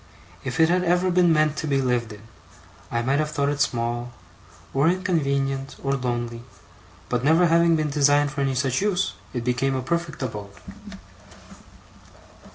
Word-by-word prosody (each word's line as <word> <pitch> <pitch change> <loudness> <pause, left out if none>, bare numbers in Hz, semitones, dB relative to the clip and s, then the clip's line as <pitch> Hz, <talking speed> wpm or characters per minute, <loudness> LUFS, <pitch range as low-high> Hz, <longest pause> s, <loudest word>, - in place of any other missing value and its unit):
If 130 +1 -4
it 160 - +6
had 180 +1 +2
ever 180 +1 +2
been 175 -1 +4
meant 155 -1 +2
to 155 - -3
be 140 -2 +1
lived 125 -3 0
in, 105 0 -11 0.7
I 120 0 -1
might 135 +4 +1
have 155 0 0
thought 145 -2 0
it 145 0 -2
small, 120 0 -1 0.6
or 140 +3 +3
inconvenient, 140 -7 -1
or 135 - 0
lonely; 120 -3 -3 0.7
but 125 0 -1
never 160 +5 +4
having 170 0 +4
been 155 -2 -1
designed 145 0 +3
for 140 0 -3
any 135 -1 0
such 130 +3 0
use, 195 -2 0 0.2
it 120 -2 -4
became 125 +2 0
a 130 - -2
perfect 170 -1 -3
abode. 105 -5 -6
140 Hz, 165 wpm, -24 LUFS, 125-160 Hz, 0.7 s, it